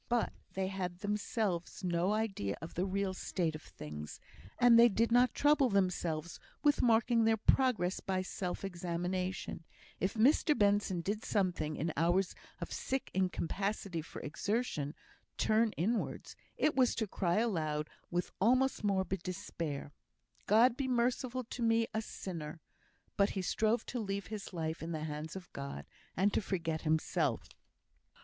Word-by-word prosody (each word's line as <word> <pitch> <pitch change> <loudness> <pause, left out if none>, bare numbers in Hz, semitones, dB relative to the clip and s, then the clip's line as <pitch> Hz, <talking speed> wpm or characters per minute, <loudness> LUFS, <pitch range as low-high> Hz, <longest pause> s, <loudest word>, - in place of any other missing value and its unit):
But 240 -1 +1 0.2
they 190 0 -1
had 180 -2 -4
themselves 205 -4 -2
no 175 +1 +1
idea 195 - -1
of 165 - -8
the 180 +3 -1
real 195 0 -1
state 175 -3 -1
of 155 - -7
things; 75 - -8 0.4
they 240 -1 +8
did 230 +3 +1
not 245 0 +4
trouble 290 -3 +4
themselves 175 -5 0 0.2
with 290 -1 +4
marking 230 0 +4
their 225 0 +4
progress 215 -6 +2
by 185 -1 -1
self 185 0 -4
examination; 180 0 -3 0.4
if 190 +4 0
Mr 285 +6 +4
Benson 205 -3 +2
did 210 +5 -2
sometimes, 175 -7 0
in 160 +1 -1
hours 175 +3 +2 0.3
of - - -5
sick 270 0 -2
incapacity 190 0 -1
for 160 - -9
exertion, 170 - -2 0.4
turn 220 +1 +3
inwards, 220 +7 -2 0.2
it 300 - +2
was 255 -2 +4
to 220 - 0
cry 180 -3 0
aloud 155 -9 0 0.2
with 175 0 -1
almost 255 +4 +3
morbid 190 -2 0
despair, 165 -6 -4 0.6
"God 230 +4 +6
be 270 0 -2
merciful 250 +1 0
to 240 +1 -7
me 230 0 +3
a 220 - 0
sinner!" 165 -7 -6 0.6
But 200 0 +4
he 190 - -1
strove 220 +5 +1
to 245 - -4
leave 200 -2 -3
his 210 -2 -5
life 160 -2 -3
in 165 +1 -4
the 155 -1 -3
hands 155 +2 -5
of 190 -1 -9
God, 140 - -6 0.3
and 200 +3 +3
to - - +2
forget 165 -5 -2
himself. 155 -1 0
195 Hz, 150 wpm, -34 LUFS, 170-225 Hz, 0.6 s, they